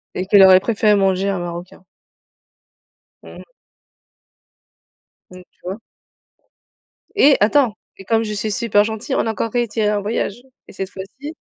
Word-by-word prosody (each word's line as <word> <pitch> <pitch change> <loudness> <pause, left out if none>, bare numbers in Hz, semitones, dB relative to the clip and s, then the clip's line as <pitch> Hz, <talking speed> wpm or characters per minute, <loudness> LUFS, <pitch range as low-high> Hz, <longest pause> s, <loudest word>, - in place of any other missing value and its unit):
Et 185 - -3
qu'elle 195 0 +6
aurait 185 -1 +7
préféré 210 0 +1
manger 195 0 +1
un 195 -2 -2
marocain. 175 +2 -8 1.4
Mmh - - -13
mh. - - -14 1.8
Mmh, 180 0 -12
tu - - -42
vois? 190 +3 -5 1.4
Et 290 -8 +5
attends: 230 +2 +3 0.2
et 195 - -13
comme 225 +2 +1
je 210 -1 -4
suis 210 +1 -3
super 205 -2 +2
gentille 220 +6 -4
on - - 0
a 225 - -1
encore 225 0 -4
réitéré 230 -3 -1
un 205 -1 -1
voyage 220 +2 -3 0.2
et - - -14
cette 190 0 -5
fois-ci 265 +12 -9
210 Hz, 150 wpm, -19 LUFS, 190-225 Hz, 1.8 s, aurait